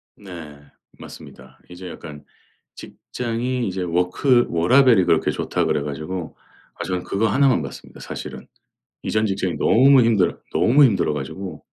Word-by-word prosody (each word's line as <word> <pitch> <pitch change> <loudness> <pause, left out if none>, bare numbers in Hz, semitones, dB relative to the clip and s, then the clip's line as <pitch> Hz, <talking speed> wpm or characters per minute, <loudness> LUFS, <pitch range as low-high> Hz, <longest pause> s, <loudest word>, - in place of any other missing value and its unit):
네. 85 -7 -11 0.4
맞습니다. 65 +1 -13
이제 90 +1 -9
약간 75 -3 -10 0.5
직장이 120 0 -4
이제 95 0 -4
워크 90 +9 +2
워라벨이 115 +4 +4
그렇게 - - +2
좋다 - - -2
그래 75 - 0
가지고 80 +4 -6 0.4
아 - - -6
저는 90 -1 -3
그거 105 +3 0
하나만 130 - +2
봤습니다 70 - -10
사실은. - - -8 0.6
이전 110 0 0
직장이 95 -3 -2
너무 135 +2 +5
힘들어 110 -6 +1
너무 140 +5 +4
힘들어 110 -8 +2
가지고 90 -6 -7
95 Hz, 320 characters per minute, -21 LUFS, 85-120 Hz, 0.6 s, 너무